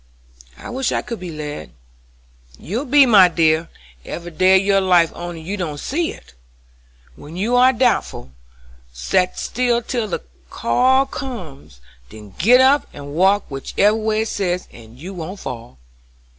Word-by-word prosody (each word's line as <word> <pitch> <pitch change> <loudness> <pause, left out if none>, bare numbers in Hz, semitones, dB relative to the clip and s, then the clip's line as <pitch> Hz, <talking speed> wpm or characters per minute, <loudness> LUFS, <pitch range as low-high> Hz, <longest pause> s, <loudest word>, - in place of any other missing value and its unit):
"I - - -9
wish 260 0 -1
I - - -1
could 235 -2 -6
be 180 -1 -7
led." 150 - -7 0.8
"You 230 - -4
be, 280 +1 +6
my 205 -7 +7
dear, 165 -1 +1 0.3
every 175 0 -7
day 185 +3 +4
of 195 - -4
your 195 -1 +3
life 175 -3 +3
only 175 -1 -7
you 195 +6 -5
don't 160 -6 -4
see 325 - -2
it. - - -15 0.8
When 150 - -11
you 225 +6 0
are 250 +1 +6
doubtful, 240 - -1 0.6
set 180 - 0
still 240 -1 0
till 235 -3 -2
the 185 - -4 0.3
call 260 - +2
comes, 175 - -9 0.3
then 105 -3 -13
git 245 +8 +6
up 275 +2 +4
and 145 0 -9
walk 195 +5 +3
whichever 195 +9 0
way 220 0 -1
it - - -5
says, 180 -2 -2
and 115 0 -15
you 185 +6 -8
won't 185 +3 -7
fall. 115 - -8
185 Hz, 155 wpm, -19 LUFS, 155-235 Hz, 0.8 s, my